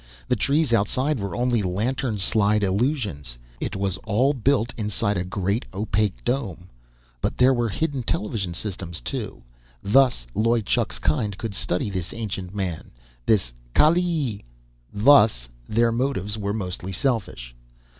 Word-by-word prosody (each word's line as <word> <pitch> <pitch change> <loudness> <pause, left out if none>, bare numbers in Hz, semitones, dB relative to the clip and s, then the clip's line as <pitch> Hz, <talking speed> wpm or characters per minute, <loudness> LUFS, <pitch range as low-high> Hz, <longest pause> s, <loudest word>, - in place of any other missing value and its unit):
The - - +4
trees 140 +3 +1
outside 130 +6 +1
were 100 -1 -4
only 120 -2 +1
lantern 110 +5 -1
slide 105 +1 +3
illusions. 100 - -1 0.2
It - - -3
was 95 -1 -1
all 125 +7 +1
built 125 -2 +1
inside 105 -1 0
a 90 - -1
great, 100 +4 -1
opaque 100 - -1
dome. 95 - -3 0.5
But - - -1
there 130 +1 +5
were 120 -2 0
hidden 145 +4 -1
television 105 -5 -2
systems, 90 -3 -4
too. - - -5 0.4
Thus 120 - +4
Loy 115 +1 +2
Chuk's 115 +2 0
kind 110 -10 0
could 110 -1 -4
study 95 +1 -1
this 90 -3 -4
ancient 100 -4 -5
man 95 -5 -3 0.4
this 95 - +2 0.2
Kaalleee. 155 - +3 0.5
Thus, 105 - +5 0.2
their 115 +2 +3
motives 115 -5 -1
were 100 -2 -2
mostly 95 -3 -4
selfish. 95 - -2
105 Hz, 135 wpm, -24 LUFS, 95-125 Hz, 0.5 s, there